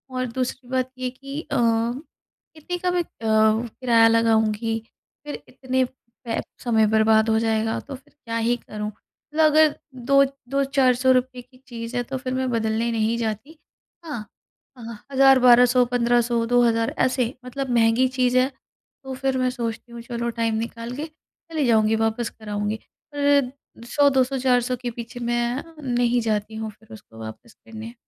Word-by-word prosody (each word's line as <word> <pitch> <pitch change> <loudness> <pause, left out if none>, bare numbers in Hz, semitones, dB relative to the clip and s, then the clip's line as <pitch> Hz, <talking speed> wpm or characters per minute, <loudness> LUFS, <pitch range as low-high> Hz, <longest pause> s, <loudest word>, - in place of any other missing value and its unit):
और 255 0 -1
दूसरी 255 0 -4
बात 255 0 -1
ये 255 - -8
है - - 0
कि 275 +3 -7
अ, - - 0
कितने 245 +8 -3
का 360 +1 -1
भी 355 - +1
अ, - - -3 0.2
किराया 225 +2 +3
लगाऊँगी 225 0 +2 0.5
फिर 295 - -6
इतने 260 0 -1
पै 235 -2 -7 0.2
समय 225 -3 +3
बर्बाद 220 0 +4
हो 220 - +3
जाएगा 225 0 0
तो 280 - -8
फिर 260 +1 -18
क्या 230 -6 -5
ही 230 +1 +1
करूँ? 210 -2 -6
मतलब 300 +8 -3
अगर 310 0 +5 0.2
2, 275 +3 +4 0.3
2-400 265 -2 +2
रुपए 255 0 -8
की 255 +1 -22
चीज 230 0 -7
है 245 - 0
तो 265 - -1
फिर 255 0 -4
मैं 260 0 -1
बदलने 225 0 0
नहीं 225 0 0
जाती। 230 +7 -4 0.5
हाँ, 240 -9 -5 0.5
आहा, 230 -2 -8
1000, 270 -1 +6
1200, 250 0 +6
1500, 240 -1 +1
2,000 230 -1 +2
ऐसे 255 -1 0
मतलब 270 +1 -4
महँगी 230 +3 +4
चीज 250 -1 +2
है 255 +1 +3 0.5
तो 265 0 -6
फिर 265 0 -1
मैं 255 0 +1
सोचती 235 -1 -5
हूँ 235 0 -8
चलो 235 0 -3
टाइम 225 -1 +1
निकाल 230 0 -8
के 295 +3 -4
चली 315 -1 -6
जाऊँगी 220 -1 +3
वापस 225 +1 -1
कर 215 -1 -13
आऊँगी। 205 +1 -2 0.4
फिर 285 -3 +3 0.4
100 285 +3 +4
200 265 0 +1
400 250 -1 +2
के 245 -1 -3
पीछे 235 +1 -8
मैं 240 +2 -1 0.3
नहीं 240 0 +2
जाती 215 -1 -2
हूँ 220 0 -4
फिर 220 - -22
उसको 115 - -14
वापस 110 - -10
करने। 225 +1 -10
240 Hz, 165 wpm, -23 LUFS, 225-260 Hz, 0.5 s, 1000